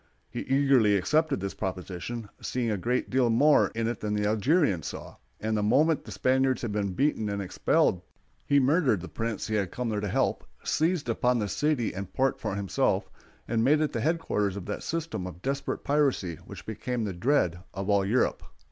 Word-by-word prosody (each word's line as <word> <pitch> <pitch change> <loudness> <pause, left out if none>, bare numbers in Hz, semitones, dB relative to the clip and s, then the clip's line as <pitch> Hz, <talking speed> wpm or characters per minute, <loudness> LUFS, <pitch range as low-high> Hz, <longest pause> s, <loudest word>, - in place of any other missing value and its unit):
He - - -4
eagerly 130 -6 +3
accepted 155 - +1
this 100 0 -3
proposition, 95 +4 -5
seeing 120 -3 -1
a - - +1
great 125 +6 -1
deal 130 -2 +3
more 145 +7 +5
in 115 0 0
it 120 - -3
than 105 0 -2
the 105 0 0
Algerians 110 - +2
saw; - - -8 0.2
and 110 0 -1
the 105 - +1
moment 140 +9 +3
the 110 - -9
Spaniards 130 +6 +1
had 120 - -2
been 100 -2 -1
beaten 125 -2 0
and 100 0 -2
expelled 90 -1 +1 0.4
he 140 - +3
murdered 135 - +3
the 90 - -7
prince 115 -2 -3
he 110 - -4
had 100 -4 0
come 125 +4 -3
there 105 -1 -1
to 105 - -2
help, - - 0 0.2
seized 160 -2 0
upon 125 +1 +1
the 105 -3 -1
city 145 +1 0
and 95 0 -6
port 135 0 +1
for 100 - -2
himself, 100 -1 0 0.4
and 115 -1 +1
made 150 +5 +4
it 155 -1 0
the 115 - -1
headquarters 140 - 0
of 100 -3 -6
that 105 - -4
system 165 - -3
of 90 0 -10
desperate 135 +1 -2
piracy 140 - +1
which - - -10
became 120 +2 -3
the 100 -3 -2
dread 90 - +1
of 95 +1 -5
all 100 -1 +3
Europe. 110 +6 +1
115 Hz, 200 wpm, -28 LUFS, 100-135 Hz, 0.4 s, more